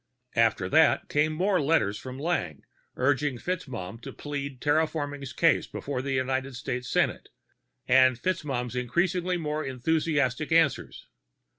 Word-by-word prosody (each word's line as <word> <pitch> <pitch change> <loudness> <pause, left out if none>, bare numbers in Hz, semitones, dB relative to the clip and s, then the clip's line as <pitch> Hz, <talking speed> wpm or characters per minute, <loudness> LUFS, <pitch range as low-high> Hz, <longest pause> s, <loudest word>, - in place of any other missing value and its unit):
After 110 -5 +2
that - - +3
came 150 +2 +2
more 180 +3 +1
letters 135 -9 +1
from 130 0 -8
Lang, 135 - -2 0.3
urging 135 0 +1
FitzMaugham 120 - -5
to - - -7
plead 140 -3 -5
terraforming's 145 -2 -1
case 165 +4 +2
before 140 -3 -4
the 135 0 -3
United 130 0 -1
States 125 0 -4
Senate, - - 0 0.6
and 130 -1 +5
FitzMaugham's 130 -7 -2
increasingly 175 +8 0
more 155 -2 -2
enthusiastic 150 +1 0
answers. 160 -4 +1
140 Hz, 125 wpm, -27 LUFS, 125-155 Hz, 0.6 s, and